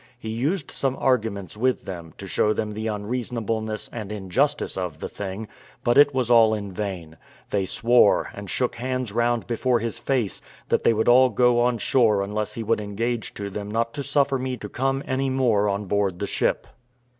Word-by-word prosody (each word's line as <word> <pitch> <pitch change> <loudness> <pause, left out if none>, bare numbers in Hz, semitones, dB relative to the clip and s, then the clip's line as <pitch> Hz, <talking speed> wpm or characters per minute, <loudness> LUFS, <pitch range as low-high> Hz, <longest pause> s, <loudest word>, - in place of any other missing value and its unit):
He 110 -2 -7
used 140 - -1
some 135 -1 -1
arguments 110 -8 0
with 125 +4 0
them, 85 -5 -8
to - - -8
show 105 - +1
them 110 0 -2
the 110 +1 -4
unreasonableness 110 0 -3
and 105 -3 -6
injustice 125 +9 0
of 90 -5 -4
the - - -4
thing, 100 +2 -6 0.4
but 120 - +3
it 145 0 +7
was 130 -3 0
all 110 -2 +6
in 100 -2 -5
vain; 90 -5 -5 0.3
they 100 -2 0
swore, 120 +1 +3
and 100 -1 -8
shook 125 -2 -1
hands 130 -2 -2
round 120 +1 +1
before 120 +1 +1
his 115 0 -3
face, 125 -8 -1 0.3
that - - +2
they - - +5
would 110 0 0
all 130 +2 +7
go 120 +1 +3
on 120 0 +2
shore 110 -4 +3
unless 105 +1 -3
he 115 - -4
would 110 0 +1
engage 115 +3 -3
to 100 -1 -5
them 100 +1 -5
not 115 +2 -1
to 145 - -4
suffer 140 -1 +1
me 130 0 -3
to 105 -2 -8
come 135 +4 -1
any 135 +1 0
more 115 -6 +2
on 100 +1 -2
board 100 -2 0
the 100 - -2
ship. - - 0
115 Hz, 195 wpm, -24 LUFS, 105-125 Hz, 0.4 s, it